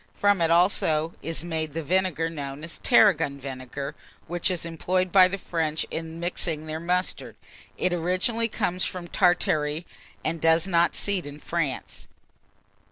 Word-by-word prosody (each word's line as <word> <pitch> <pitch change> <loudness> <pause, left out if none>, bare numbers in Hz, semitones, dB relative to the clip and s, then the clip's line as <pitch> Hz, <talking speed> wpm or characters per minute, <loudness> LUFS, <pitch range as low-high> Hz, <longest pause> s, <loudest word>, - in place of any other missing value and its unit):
From 205 -3 +3
it 165 - +3
also 165 -2 +3
is 165 -1 -4
made 160 -3 -2
the 165 +1 -3
vinegar 180 -1 +1
known 145 -2 -6
as 170 - -7
tarragon 165 - +4
vinegar, 135 +1 -6 0.3
which 175 +3 0
is 180 -2 -2
employed 180 +2 -1
by 185 -2 +7
the 190 +2 -3
French 160 -4 -1
in 165 0 -5
mixing 165 -2 -1
their 155 0 -4
mustard. 180 +2 -1 0.4
It 185 - +1
originally 185 +7 0
comes 185 -5 -1
from 180 -2 -4
Tartary, 165 -3 +1 0.4
and 160 +1 -1
does 165 +1 +4
not 170 -3 +2
seed 195 -6 -1
in 145 0 -8
France. 155 -4 -3
170 Hz, 150 wpm, -26 LUFS, 155-180 Hz, 0.4 s, by